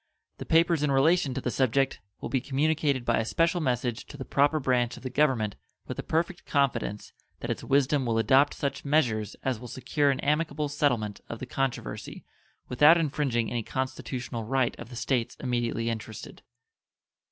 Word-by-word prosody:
The - - -7
papers 165 -1 +4
in 150 - +1
relation 140 0 +3
to - - -2
the 125 - -2
subject 135 +2 +1 0.2
will - - -4
be 130 - 0
communicated 140 -1 0
by - - +2
a - - +1
special 165 +9 +1
message 125 -4 -1
to 145 - -10
the 135 - -6
proper 145 +3 +2
branch 125 -3 +1
of - - -13
the 130 - -4
Government 125 -8 +1 0.3
with - - -5
the - - -2
perfect 170 +3 -1
confidence 120 -7 -1 0.3
that - - -3
its - - -4
wisdom 140 -1 +2
will 115 -1 +1
adopt 135 +6 +4
such 140 -1 -3
measures 125 -8 +1
as 130 -4 -1
will 125 - -8
secure 130 +4 0
an 135 -1 +1
amicable 150 0 0
settlement 120 -8 0
of 115 - -5
the 130 - -6
controversy 135 +1 -4 0.4
without 150 +7 +6
infringing 140 -7 0
any 120 -1 -1
constitutional 125 -1 -4
right 130 +2 0
of 120 - -8
the 125 - -9
States 120 -1 -1
immediately 120 -2 -1
interested. 110 -1 -6
130 Hz, 175 wpm, -28 LUFS, 120-145 Hz, 0.4 s, without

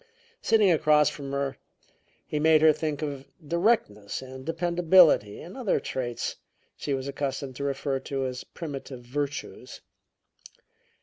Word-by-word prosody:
Sitting 215 -4 +4
across 150 -2 +4
from 140 -2 -7
her, 140 -1 -2 0.7
he 150 - -2
made 155 0 +5
her 155 -1 +7
think 155 -1 -3
of 140 -3 -4 0.2
directness 170 - +1
and 130 0 -9
dependability 170 - +4
and 175 - -10
other 250 -7 0
traits 120 -2 -4 0.4
she 140 - -2
was 135 0 -4
accustomed 135 -1 -3
to - - -4
refer 135 -1 -1
to 135 -1 -3
as 125 0 -4
"primitive 135 -6 -8
virtues." 145 +3 -5
145 Hz, 130 wpm, -27 LUFS, 135-160 Hz, 0.7 s, her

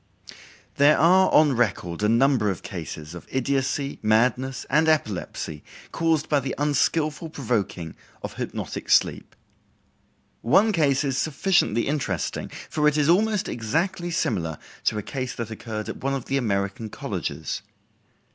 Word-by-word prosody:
There 145 +2 +6
are 185 +4 +5
on 150 -3 +5
record 95 -6 -1
a 105 - +2
number 120 -2 +3
of 95 - -4
cases 80 -3 -7
of 85 - -10
idiocy, 135 +2 -1
madness, 125 +4 +1
and 150 +3 +3
epilepsy 105 - -1 0.3
caused 165 -2 +1
by 145 - +3
the 135 -1 -4
unskillful 150 +2 0
provoking 100 - -2 0.3
of - - -5
hypnotic - - -5
sleep. - - +2 1.1
One 200 - +4
case 150 -7 +2
is 135 -2 -1
sufficiently 155 - +1
interesting, 130 - -2 0.2
for 150 -1 +1
it 150 0 +2
is 150 0 +2
almost 210 +3 +3
exactly 165 - -1
similar 85 - -1 0.3
to 110 - +2
a 105 - -3
case 130 +1 -4
that 115 -2 -5
occurred 110 -1 -5
at - - -5
one 135 +1 -1
of 135 - -5
the 135 - 0
American 100 -2 -1
colleges. - - -4
135 Hz, 140 wpm, -24 LUFS, 110-155 Hz, 1.1 s, There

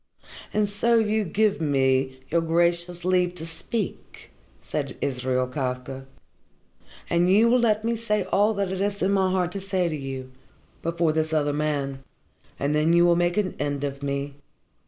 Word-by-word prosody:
"And 210 -1 +1
so 230 +4 +2
you 220 -1 +2
give 205 +1 +1
me 130 -2 +1
your 170 +1 +3
gracious 170 +1 0
leave 180 -1 +2
to 165 -2 -6
speak," 190 +5 -5 0.3
said - - -4
Israel 130 -1 0
Kafka. 130 0 -4 1.0
"And 175 +1 +2
you 210 +5 +5
will 245 +2 +4
let 220 -2 +2
me 230 +1 0
say 210 -3 0
all 205 +4 +2
that 200 -2 -1
is 200 +2 -2
in 190 - +2
my 190 -1 +2
heart 180 -2 0
to 195 - -5
say 190 -2 0
to 155 - -3
you 135 -2 -6 0.5
before 170 -1 0
this 160 0 0
other 145 -2 +1
man. 145 -2 -1 0.6
And 145 +1 0
then 155 +2 +3
you 170 0 +5
will 175 0 +5
make 175 +1 +1
an 195 -4 0
end 145 -1 -2
of 140 0 -4
me. 140 0 -3
170 Hz, 170 wpm, -25 LUFS, 140-200 Hz, 1.0 s, you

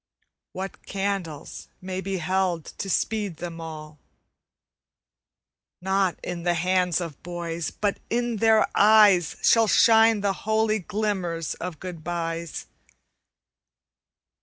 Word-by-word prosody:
What 190 +1 -6
candles 195 -6 -4
may 185 0 -5
be 195 0 -3
held 185 -2 -1
to 195 - -3
speed 205 -3 -1
them 165 0 -7
all? 155 -2 -9 1.8
Not 190 -1 0
in 175 -1 -4
the 175 0 +1
hands 180 0 +1
of 165 -5 -7
boys, 170 -1 -4
but 205 -1 -2
in 240 -1 -1
their 220 0 +4
eyes 205 -5 +5
Shall 225 -1 +5
shine 225 -1 +5
the 200 -1 +1 0.2
holy 220 0 +2
glimmers 185 -5 -2
of 175 -3 -7
good 180 -4 -8
byes. 165 -1 -4
185 Hz, 110 wpm, -25 LUFS, 170-205 Hz, 1.8 s, eyes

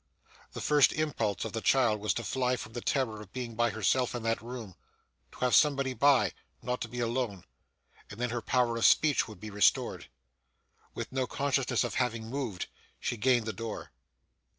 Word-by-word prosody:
The - - -6
first 150 -2 +4
impulse 130 -10 -1
of - - -5
the 115 - -2
child 120 -5 +3
was 105 +1 0
to 120 - -3
fly 125 +4 0
from 110 -2 -8
the 120 - -4
terror 115 -6 -1
of 100 -3 -13
being 125 -2 -5
by 120 +1 +2
herself 115 +4 +1
in 120 - -4
that 115 -2 0
room 115 -4 -7 0.6
to - - -14
have 125 -1 +2
somebody 140 -3 +4
by 135 +2 +4 0.3
not 125 +1 -2
to - - -2
be 120 +2 -7
alone 115 -5 -2 0.7
and 105 - -10
then 125 -1 -1
her 120 -1 -2
power 120 0 +1
of 115 - +1
speech 150 -3 +4
would 110 -4 -11
be 105 +3 -8
restored. 100 -2 +2 0.9
With - - -5
no 130 -1 -1
consciousness 135 -3 0
of - - -3
having 115 -3 -1
moved, 125 -9 -3 0.3
she - - -2
gained 120 0 +2
the 110 - -3
door. 110 +1 -6
120 Hz, 190 wpm, -30 LUFS, 110-130 Hz, 0.9 s, first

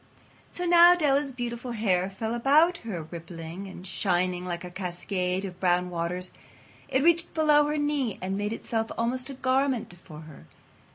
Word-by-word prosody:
So 355 - -5
now 345 0 +8
Della's 285 -4 +1
beautiful 245 -1 -5
hair 190 -4 +1
fell 220 +4 -4
about 300 +8 +4
her 200 - -6
rippling 165 +3 -8
and 185 -1 -10
shining 180 -1 0
like 175 0 -4
a 180 - -8
cascade 180 +1 -2
of 180 -2 -8
brown 180 -1 +1
waters. 175 +2 -3 0.6
It 265 0 +1
reached 340 0 +2
below 300 -2 +4
her 300 +1 -1
knee 290 -7 -1
and 190 +1 -3
made 205 +1 -2
itself 225 0 -3
almost 250 +3 -1
a 275 - -6
garment 260 -5 0
for 155 -3 -11
her. 155 - -14
215 Hz, 165 wpm, -27 LUFS, 180-275 Hz, 0.6 s, now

